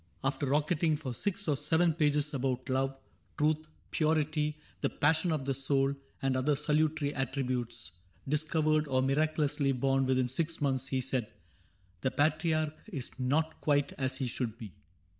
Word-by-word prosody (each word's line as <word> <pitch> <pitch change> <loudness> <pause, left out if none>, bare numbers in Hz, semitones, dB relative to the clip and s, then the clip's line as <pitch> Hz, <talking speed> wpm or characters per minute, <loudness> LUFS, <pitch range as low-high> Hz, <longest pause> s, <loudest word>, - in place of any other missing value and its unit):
After 135 +1 0
rocketing 150 +3 +2
For 135 -5 -5
six 200 - -3
or 150 - +3
seven 160 +4 +2
pages 150 -2 +2
about 130 -1 -1
love. 135 +1 0 0.4
Truth, 155 +1 +1 0.2
purity, 155 -1 +1 0.2
the - - +2
passion 160 +4 +2
of 150 -4 -1
the 135 - +1
soul. 135 +1 +1 0.3
And 135 -1 +2
other 135 +3 +2
salutary 150 0 +1
attributes. 125 -3 -2 0.4
Discovered 155 +1 +2
or 130 -1 +2
miraculously 145 0 +1
born 135 +1 +1
Within 130 -1 +2
six 160 +6 -2
months, 135 -3 0
he 130 -1 0
said: 125 -3 -2 0.4
" 90 -2 -36
The - - +2
Patriarch 155 +1 +1 0.2
Is 135 -8 -5
not 155 +5 0
quite 145 -2 +2
as 130 -1 -1
he 135 - -1
should 120 -2 -3
be. 110 -7 -9
145 Hz, 155 wpm, -31 LUFS, 130-155 Hz, 0.4 s, or